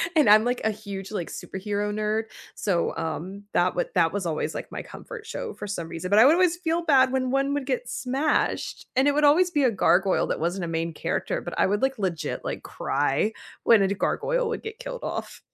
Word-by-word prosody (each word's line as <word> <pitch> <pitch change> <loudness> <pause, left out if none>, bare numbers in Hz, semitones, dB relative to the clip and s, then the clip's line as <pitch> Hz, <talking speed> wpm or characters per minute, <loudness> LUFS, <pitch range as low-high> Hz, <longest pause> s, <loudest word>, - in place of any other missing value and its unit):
and 300 -8 +5
I'm, 215 +1 +8
like, 245 +1 0
a 220 - +3
huge, 200 -2 -7
like, 180 -5 -3
superhero 205 +2 -3
nerd, 215 +1 0 0.3
so, 180 -5 0
um, 170 +5 -4
that 175 +1 +3
wa 175 - +2
that 165 -3 +4
was 200 -2 -3
always, 160 -2 -2
like, - - -6
my - - -4
comfort - - -10
show 455 0 -5
for - - -7
some 170 -5 -4
reason. 165 +2 -5
But 205 +2 +5
I 225 - +8
would 290 - +7
always 355 -1 +3
feel 340 -1 -1
bad 265 -5 +4
when 255 -1 0
one 275 +1 +1
would 285 -2 -2
get 250 -2 -2
smashed, 270 +4 -1
and 265 +2 +4
it 290 - +4
would 300 +1 +1
always 350 +5 +5
be 295 -4 +2
a 250 - +4
gargoyle 190 -2 +3
that - - -2
wasn't 175 +2 -1
a - - -5
main 165 0 -2
character, 165 +2 -2
but 175 - -7
I - - +4
would, 205 +2 0
like, 265 0 +1
legit, 185 -6 -3
like, - - -4
cry 150 +11 0 0.3
when 225 -3 +6
a 195 - +3
d 200 - -1
gargoyle - - 0
would 460 - -4
get 445 +1 -7
killed - - -6
off. - - -5
215 Hz, 230 wpm, -25 LUFS, 190-290 Hz, 0.3 s, I'm